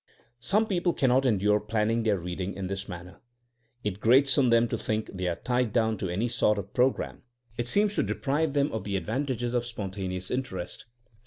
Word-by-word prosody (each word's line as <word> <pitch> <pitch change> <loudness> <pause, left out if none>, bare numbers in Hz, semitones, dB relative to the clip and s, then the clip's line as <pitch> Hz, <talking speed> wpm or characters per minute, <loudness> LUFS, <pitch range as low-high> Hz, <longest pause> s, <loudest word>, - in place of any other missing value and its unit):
Some 195 - +2
people 175 -4 0
cannot 130 0 +3
endure 105 -2 +3
planning 110 +2 0
their 110 -3 +2
reading 90 +2 -4
in 95 0 -4
this 95 +1 -4
manner. 90 +1 -9 0.6
It 105 -2 -2
grates 130 +5 +5
on 130 -3 +4
them 115 0 +4
to - - -1
think 110 0 -2
they 90 -1 -2
are 85 - 0
tied 125 0 0
down 110 -2 +2
to 95 - -2
any 100 +7 0
sort 105 -2 +2
of 100 0 -6
pro 125 +2 +5
gram; - - -6 0.3
it 120 0 -3
seems 205 +9 +2
to - - +4
deprive 145 +1 0
them 145 0 +2
of 110 -3 -3
the 100 -1 -1
advan 120 +11 -2
tages 120 -2 -2
of 120 -1 +1
spontaneous 95 -5 -4
interest. 115 -6 -4
110 Hz, 200 wpm, -28 LUFS, 95-130 Hz, 0.6 s, grates